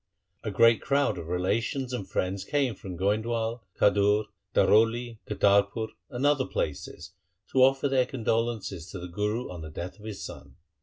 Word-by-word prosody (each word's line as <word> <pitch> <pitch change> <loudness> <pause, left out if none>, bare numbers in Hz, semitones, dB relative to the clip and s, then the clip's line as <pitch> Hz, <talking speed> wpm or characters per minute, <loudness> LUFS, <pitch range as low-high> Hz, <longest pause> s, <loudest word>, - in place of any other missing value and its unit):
A - - -3
great 115 -1 +5
crowd 140 -8 +1
of 80 - -7
relations 115 +9 -1
and 100 -6 -4
friends 95 +1 -1
came 140 -5 0
from 95 -2 -8
Goindwal, 110 +4 0 0.2
Khadur, 105 +1 +4 0.3
Daroli, 115 +1 +3
Kartarpur, 100 +1 +2 0.2
and 130 +1 -2
other 145 -2 +3
places 70 -2 -4 0.4
to 130 - +3
offer 135 +2 +4
their 130 -2 +2
condolences 115 - -2
to - - -7
the 90 - -6
Guru 105 +5 -2
on 90 -2 -7
the 80 - -7
death 85 +6 -7
of 105 - -13
his 105 -3 -6
son. - - -10
110 Hz, 160 wpm, -28 LUFS, 100-125 Hz, 0.4 s, great